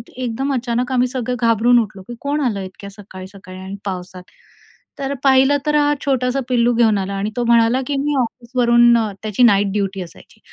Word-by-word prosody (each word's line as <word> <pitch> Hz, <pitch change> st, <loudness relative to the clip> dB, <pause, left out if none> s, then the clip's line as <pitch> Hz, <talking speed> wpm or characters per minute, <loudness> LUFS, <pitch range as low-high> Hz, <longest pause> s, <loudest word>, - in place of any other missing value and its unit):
एकदम 255 Hz, +2 st, -3 dB
अचानक 245 Hz, 0 st, -2 dB
आम्ही 250 Hz, -1 st, +2 dB
सगळे 250 Hz, -1 st, -3 dB
घाबरून 235 Hz, +1 st, +3 dB
उठलो 210 Hz, -3 st, -4 dB
की 240 Hz, -, -7 dB
कोण 290 Hz, +1 st, -2 dB
आलं 225 Hz, -7 st, -1 dB
इतक्या 190 Hz, +1 st, -9 dB
सकाळी-सकाळी 190 Hz, -1 st, -12 dB
आणि 190 Hz, +1 st, -7 dB
पावसात? 185 Hz, -1 st, -6 dB, 0.8 s
तर 275 Hz, 0 st, -3 dB
पाहिलं, 270 Hz, +1 st, +4 dB
तर 300 Hz, -, +1 dB
हा 295 Hz, 0 st, +3 dB
छोटासा 260 Hz, -1 st, 0 dB
पिल्लू 240 Hz, -1 st, +2 dB
घेऊन 225 Hz, -3 st, +3 dB
आला. 195 Hz, 0 st, -3 dB
आणि 200 Hz, +2 st, -3 dB
तो 240 Hz, -, 0 dB
म्हणाला, 235 Hz, +2 st, +3 dB
की 285 Hz, -, -2 dB
“मी 295 Hz, -1 st, -1 dB
ऑफिसवरून” 240 Hz, 0 st, +2 dB, 0.3 s
त्याची 215 Hz, +3 st, 0 dB
नाईट 200 Hz, -3 st, +4 dB
ड्युटी 195 Hz, -2 st, -2 dB
असायची, 170 Hz, -, -13 dB
235 Hz, 175 wpm, -19 LUFS, 200-255 Hz, 0.8 s, पाहिलं